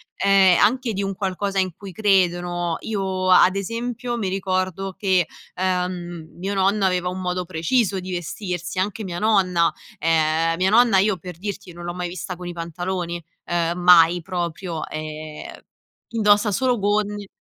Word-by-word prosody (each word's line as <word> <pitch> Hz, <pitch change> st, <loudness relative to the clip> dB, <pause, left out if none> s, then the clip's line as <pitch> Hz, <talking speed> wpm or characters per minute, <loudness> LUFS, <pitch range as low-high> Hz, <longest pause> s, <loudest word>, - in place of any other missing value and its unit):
ehm, 195 Hz, -2 st, +5 dB
anche 245 Hz, +3 st, +2 dB
di 200 Hz, +1 st, -2 dB
un 195 Hz, 0 st, -2 dB
qualcosa 195 Hz, 0 st, -2 dB
in 185 Hz, -1 st, +1 dB
cui 200 Hz, -2 st, -9 dB
credono. 175 Hz, -3 st, +1 dB
Io 190 Hz, -3 st, -2 dB
ad 185 Hz, +1 st, +6 dB
esempio 235 Hz, +4 st, -3 dB
mi 205 Hz, -, -2 dB
ricordo 190 Hz, 0 st, -2 dB
che, 185 Hz, -4 st, +2 dB, 0.3 s
ehm, 180 Hz, -3 st, -3 dB
mio 195 Hz, +3 st, -3 dB
nonno 195 Hz, +1 st, +2 dB
aveva 180 Hz, -1 st, +1 dB
un 185 Hz, +1 st, -5 dB
modo 180 Hz, 0 st, -2 dB
preciso 190 Hz, +4 st, 0 dB
di 185 Hz, +1 st, -7 dB
vestirsi 180 Hz, +1 st, -4 dB
anche 205 Hz, +3 st, -2 dB
mia 175 Hz, -2 st, -4 dB
nonna. 185 Hz, -5 st, +3 dB, 0.3 s
Ehm, 160 Hz, +1 st, +2 dB
mia 190 Hz, +2 st, +2 dB
nonna 230 Hz, -3 st, +5 dB
io 195 Hz, 0 st, +3 dB
per 180 Hz, -1 st, -9 dB
dirti 195 Hz, -2 st, -6 dB
non 175 Hz, -, -10 dB
l'ho 175 Hz, 0 st, -4 dB
mai 180 Hz, -1 st, -3 dB
vista 180 Hz, 0 st, -6 dB
con 180 Hz, 0 st, -8 dB
i 175 Hz, -, -5 dB
pantaloni, 175 Hz, 0 st, -4 dB, 0.2 s
ehm, 170 Hz, 0 st, 0 dB
mai 175 Hz, -1 st, +6 dB
proprio, 175 Hz, -2 st, -4 dB
ehm, 155 Hz, 0 st, -7 dB, 0.7 s
indossa 210 Hz, -1 st, +3 dB
solo 250 Hz, +4 st, +1 dB
gonne 205 Hz, 0 st, 0 dB
185 Hz, 160 wpm, -22 LUFS, 175-200 Hz, 0.7 s, ad